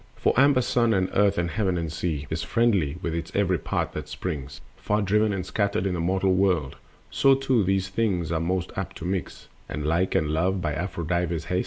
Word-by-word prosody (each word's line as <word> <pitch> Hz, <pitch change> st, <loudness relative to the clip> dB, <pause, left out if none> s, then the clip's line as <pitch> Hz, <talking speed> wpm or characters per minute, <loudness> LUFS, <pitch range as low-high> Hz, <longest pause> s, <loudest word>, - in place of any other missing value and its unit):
For -, -, +1 dB
amber 135 Hz, 0 st, +5 dB
Sun 120 Hz, -2 st, +2 dB
and 95 Hz, -1 st, 0 dB
Earth 100 Hz, 0 st, +3 dB
and 85 Hz, 0 st, 0 dB
Heaven 95 Hz, -5 st, 0 dB
and 80 Hz, -2 st, -3 dB
Sea 80 Hz, -4 st, -2 dB
Is 80 Hz, +1 st, -1 dB
friendly 95 Hz, -5 st, +1 dB
with 85 Hz, -, -2 dB
its 85 Hz, 0 st, -4 dB
every 95 Hz, -4 st, +2 dB
part -, -, -2 dB
that -, -, -6 dB
springs, 70 Hz, -7 st, -5 dB, 0.2 s
Far 105 Hz, +1 st, -1 dB
driven 105 Hz, +2 st, +2 dB
and 95 Hz, -3 st, -3 dB
scattered, 100 Hz, -1 st, 0 dB
in 95 Hz, -, 0 dB
the 90 Hz, -, -2 dB
mortal 95 Hz, +2 st, +1 dB
world; 90 Hz, -7 st, +1 dB, 0.4 s
So 135 Hz, 0 st, +4 dB
too 130 Hz, -4 st, +1 dB
those 95 Hz, 0 st, 0 dB
things 95 Hz, -5 st, 0 dB
that 80 Hz, -, 0 dB
are -, -, -2 dB
most 90 Hz, +1 st, -1 dB
apt -, -, -4 dB
to -, -, -7 dB
mix 95 Hz, 0 st, -4 dB, 0.2 s
Are -, -, -4 dB
like, 80 Hz, +5 st, 0 dB
and 75 Hz, -, +2 dB
love 90 Hz, +5 st, +1 dB
by 80 Hz, -4 st, -2 dB
Aphrodite's 85 Hz, 0 st, -2 dB
hest. 90 Hz, -, 0 dB
90 Hz, 215 wpm, -25 LUFS, 85-100 Hz, 0.4 s, amber